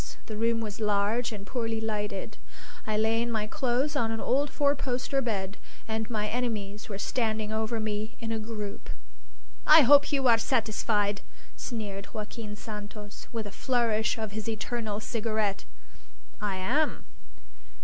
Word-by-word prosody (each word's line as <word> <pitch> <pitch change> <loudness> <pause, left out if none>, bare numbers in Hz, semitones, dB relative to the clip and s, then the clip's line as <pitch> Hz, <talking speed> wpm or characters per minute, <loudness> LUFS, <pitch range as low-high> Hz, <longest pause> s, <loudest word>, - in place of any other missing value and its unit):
The 215 - -5
room 230 +1 +2
was 215 -1 -4
large 210 +3 +2
and 205 -2 -6
poorly 225 -1 -1
lighted. 210 -2 -3 0.5
I 215 -1 +1
lay 220 +1 +3
in 235 0 -1
my 215 -2 0
clothes 265 +3 0
on 230 -5 +2
an 225 0 -1
old 280 +5 +2
four 285 0 +3
poster 270 +1 0
bed. 200 -5 -2 0.3
And 220 0 -2
my 215 -3 0
enemies 210 -3 -2
were 200 - -3
standing 220 -1 -1
over 220 +1 0
me 215 0 -2
in 225 -1 -3
a 225 - 0
group. 215 -2 -5 0.8
"I 310 +1 +10
hope 285 +2 +7
you 275 -2 +3
are 230 -2 +6
satisfied!" 215 -4 +1 0.3
sneered 205 -5 -5
Joaquin 210 0 -5
Santos, 210 -1 -8
with 225 -2 -3
a 205 - -6
flourish 230 -2 +1
of 220 -2 -3
his 220 +1 -3
eternal 220 -1 -2
cigarette. 215 -3 -1 0.8
"I 205 -2 0
am. 250 +12 +1
220 Hz, 150 wpm, -29 LUFS, 210-235 Hz, 0.8 s, I